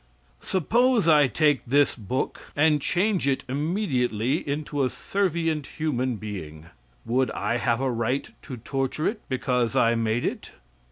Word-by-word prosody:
Suppose 230 - +2
I 150 -3 +6
take 145 0 +2
this 140 +4 +3
book 125 +4 -4
and 150 0 +3
change 185 +1 +1
it 135 -1 +1
immediately 135 - 0
into 145 -1 -1
a - - +3
servient 165 +1 -1
human 130 -5 -1
being. 90 -8 -7 0.4
Would 130 +2 +1
I 120 - -1
have 115 +1 0
a 135 -1 +1
right 120 +3 -1
to 130 -4 -8
torture 135 +5 -2
it 215 0 -2
because 125 -3 0
I 115 0 +4
made 115 +1 0
it? - - -4
135 Hz, 145 wpm, -25 LUFS, 120-155 Hz, 0.4 s, I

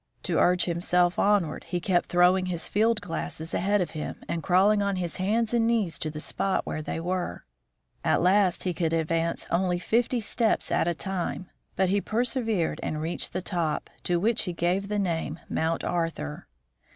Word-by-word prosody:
To - - 0
urge 180 0 +4
himself 175 +1 +1
onward, 200 -7 +2
he 175 - -2
kept 175 0 +1
throwing 180 +1 +4
his 175 -3 -3
field 220 +1 +2
glasses 165 -3 -5
ahead 200 +2 +2
of 180 - -2
him, 155 - -5
and 170 - -2
crawling 200 +4 +4
on 200 -1 0
his 175 -2 -3
hands 215 +5 0
and 230 -1 +3
knees 205 -11 +1
to 155 - -2
the 155 0 -6
spot 195 +5 0
where 155 - -3
they 155 - -4
were. 180 +1 -3 0.6
At - - +3
last 185 0 +3
he 180 - -1
could 165 -1 -1
advance 165 +1 0
only 180 0 +1
fifty 235 +6 +1
steps 225 +1 0
at - - +2
a 170 - 0
time, 185 0 -4 0.2
but 190 -1 +2
he 200 +1 +2
persevered 225 -6 -1
and 155 - -3
reached 160 +3 -3
the 185 - -3
top, 170 -6 -2
to 175 -1 +2
which 225 +5 +2
he 180 - -3
gave 180 +4 0
the 210 0 -1
name 165 -5 -1
Mount 160 +1 -1
Arthur. 165 - -3
180 Hz, 185 wpm, -27 LUFS, 170-205 Hz, 0.6 s, urge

